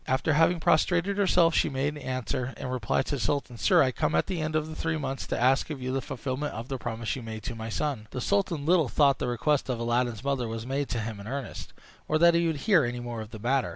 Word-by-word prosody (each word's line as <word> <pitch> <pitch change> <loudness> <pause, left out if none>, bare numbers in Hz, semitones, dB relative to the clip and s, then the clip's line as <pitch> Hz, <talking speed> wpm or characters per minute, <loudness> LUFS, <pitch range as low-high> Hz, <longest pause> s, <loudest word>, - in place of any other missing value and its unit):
After 130 +4 +1
having 165 +3 +4
prostrated 175 +5 +2
herself 175 -4 +4
she - - +2
made 140 +2 -1
answer, 130 -1 -3
in - - -6
reply 125 0 0
to 140 - -3
the - - -5
sultan: 135 -4 -1
"Sire, - - +5
I 130 - +1
come - - 0
at - - +3
the 180 -4 -3
end 155 0 -2
of 155 0 -1
three 165 0 -1
months 135 -3 -4
to - - -2
ask 130 +5 +3
of 150 -3 -5
you 130 0 -3
the 135 - 0
fulfilment 135 +2 -4
of 115 +3 -6
the 135 -2 -3
promise 115 -1 -3
you 130 - -6
made 110 -2 -7
to 130 - -4
my 115 0 -6
son." 125 -3 -2
The 125 - -5
sultan 170 -1 0
little 165 -5 +3
thought 140 -3 +3
the - - -1
request 135 +4 0
of 125 -2 -1
Aladdin's 120 -1 0
mother 135 -4 0
was 115 0 -5
made 135 +2 -2
to 115 - -1
him 110 -1 -5
in 100 - -9
earnest, 135 0 -6 0.3
or 155 - +2
that 170 +1 +6
he 170 0 +2
would 160 -3 -2
hear 190 -8 +5
any 120 0 -2
more 120 -2 -5
of 110 - -8
the 110 - -8
matter. 125 0 0
135 Hz, 260 wpm, -28 LUFS, 120-155 Hz, 0.3 s, that